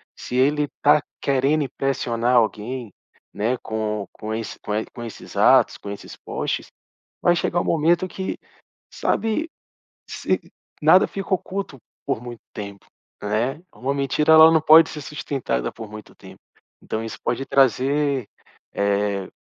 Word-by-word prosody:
Se 125 - -7
ele 145 +4 +3
está 145 +1 +3 0.2
querendo 140 +3 +2
impressionar 125 -3 0
alguém, 115 +1 0 0.4
né, 110 +5 0
com 105 -3 -3
com 110 0 -6
esse 110 0 -5
com 105 - -3
e 110 - -1
com 120 - -9
esses 115 - -9
atos, - - +5
com 100 - -9
esses 100 0 -8
posts, - - -3 0.6
vai 175 - +4
chegar 175 0 0
um - - -2
momento 170 +3 +2
que, 190 +1 -4 0.6
sabe? 225 +9 -1 0.6
Se - - -1 0.4
nada - - +6
fica 195 0 -6
oculto 190 -5 -4 0.3
por - - -1
muito 120 -1 -8
tempo, 100 -2 -8 0.4
né? 115 +9 -1
Uma 135 +3 -2
mentira, 140 +3 +2
ela 160 0 +9
não 160 -1 +4
pode 160 +1 +7
ser 150 - -7
sustentada 135 - -3
por 110 -2 -9
muito 105 -1 -11
tempo, - - -14 0.4
então 110 +1 -3
isso 115 - -7
pode 125 +3 -1
trazer, 135 0 +2 0.5
eh, 100 -1 0
130 Hz, 145 wpm, -23 LUFS, 110-150 Hz, 0.6 s, ela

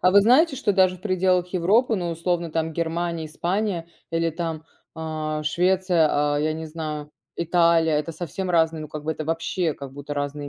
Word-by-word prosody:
а 185 - +4
вы 200 +1 +6
знаете, 270 +6 +5
что 225 -6 +1
даже 185 -1 +3
в 180 - -22
пределах 185 -2 +1
Европы, 205 +6 +2
ну, 175 -2 -2
условно, 170 0 -1
там 160 0 -1
Германия, 170 0 -2
Испания 175 +2 -2 0.2
или 165 0 +1
там, 160 -1 -4 0.3
а, 155 -1 -3
Швеция, 180 0 +2 0.3
а, - - +1
я 155 +1 0
не 160 - -5
знаю, 155 -2 -5 0.3
Италия- 170 -1 +3
это 150 +2 -3
совсем 180 +3 -5
разные, 160 -2 +2
ну, 155 - -7
как 150 0 -7
бы 160 - 0
это 155 0 -6
вообще 165 0 -1
как 140 -2 -9
будто 145 +1 -6
разные 145 0 -3
165 Hz, 190 wpm, -24 LUFS, 155-180 Hz, 0.3 s, вы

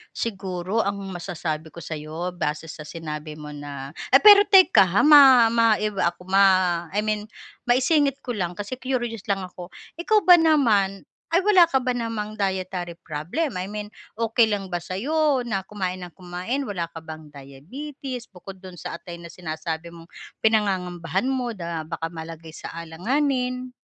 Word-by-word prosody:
Siguro 195 -1 -2
ang 200 0 -2 0.2
masasabi 165 -3 -5
ko 155 - -14
sa'yo 160 +2 -5
base 160 -2 -3
sa 155 0 -9
sinabi 155 -1 -7
mo 150 -1 -8
na 145 0 -8 0.2
eh, 270 - +8
pero 410 +2 +9
teka 375 - +6
ha, 190 +10 +2
ma 270 -5 +8
maiba 215 -5 +2
ako, 180 +1 -17
ma 195 +1 +4 0.5
I 200 - -3
mean 215 0 -2 0.3
maisingit 275 +3 +2
ko 245 -3 -5
lang 180 -4 -3
kasi 205 +5 -4
curious 240 -4 -3
lang 195 - +2
ako, 180 0 -11 0.2
ikaw 425 +6 +2
ba 360 - +10
naman, 235 - +3 0.2
ay 335 - +4
wala 380 -4 +7
ka 265 - +3
ba 250 -1 -1
namang 225 -3 -4
dietary 185 -4 -3
problem, 175 - -3
I 185 +2 -4
mean 210 0 -5 0.3
okey 225 0 +2
lang 200 -2 -2
ba 175 -2 -4
sa'yo 265 - 0
na 195 -5 -2
kumain 185 -2 -4
nang 180 - -8
kumain, 185 +11 -4
wala 175 -6 -4
ka 165 - -9
bang 155 -1 -10
diabetes, 235 - -8
bukod 190 0 -12
do'n 185 -1 -11
sa 170 0 -7
atay 175 - -10
na 170 0 -10
sinasabi 160 0 -6
mong 165 0 -14 0.3
pinangangambahan 190 -1 0
mo 250 -3 -2
na 170 -4 -5
baka 165 0 -4
malagay 165 0 -9
sa 155 - -10
alanganin? 250 - -2
195 Hz, 165 wpm, -24 LUFS, 170-245 Hz, 0.5 s, ba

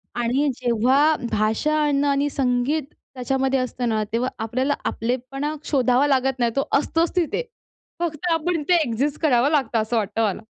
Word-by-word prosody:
आणि 245 +5 +1
जेव्हा 255 +6 +2 0.2
भाषा 225 +9 +1
अन्न 285 -1 +1
आणि 285 0 +1
संगीत 270 +3 0
त्याच्यामध्ये 265 +1 -2
असतं 250 -1 -2
ना, 215 -1 0
तेव्हा 245 +2 0
आपल्याला 255 +5 0
आपलेपणा 260 +5 -2
शोधावा 260 -1 +2
लागत 265 -1 +1
नाही, 235 -1 +2
तो 275 - +1 0.2
असतोच 330 +4 -1
तिथे. 355 +6 0 0.6
फक्त 340 0 -2
आपण 330 +1 0
इथे 305 +4 +2
एक्झिस्ट 275 +6 -1
करावं 275 -3 +3
लागतं 260 -7 +1
असं 220 +2 -2
वाटतं 215 +1 -1
मला. 205 +2 -4
265 Hz, 155 wpm, -22 LUFS, 240-295 Hz, 0.6 s, करावं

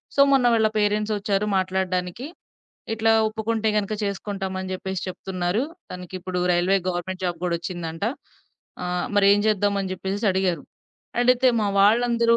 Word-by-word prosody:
So 280 - +5
మొన్న 270 -2 +4
వాళ్ళ 220 -1 +4
parents 210 +1 +1
ఒచ్చారు 205 0 0
మాట్లాడడానికి. 185 +4 -2 0.7
ఇట్లా 225 0 +2 0.2
ఒప్పుకుంటే 220 0 -1
గనక, 210 0 0
చేసుకుంటామని 195 -2 -4
జెప్పేసి 190 0 -4
చెప్తున్నారు. 185 +2 -2 0.3
తనకిప్పుడు 180 0 -5
రైల్వే 175 +3 +3
గవర్నమెంట్ 185 +1 -3
జాబ్ 175 -1 -2
గూడా 175 -1 +1
ఒచ్చిందంట. 165 -1 -6 0.8
ఆహ్, 180 0 -2
మరేం 200 0 +6
జేద్దాం?" 205 -1 +2
అని 190 -1 -3
జెప్పేసేసి 195 +3 -3
అడిగారు. 185 -5 0 0.6
అడిగితే 250 +1 +4
మా - - +1
వాళ్ళందరూ 235 +2 +4
195 Hz, 130 wpm, -24 LUFS, 185-215 Hz, 0.8 s, మరేం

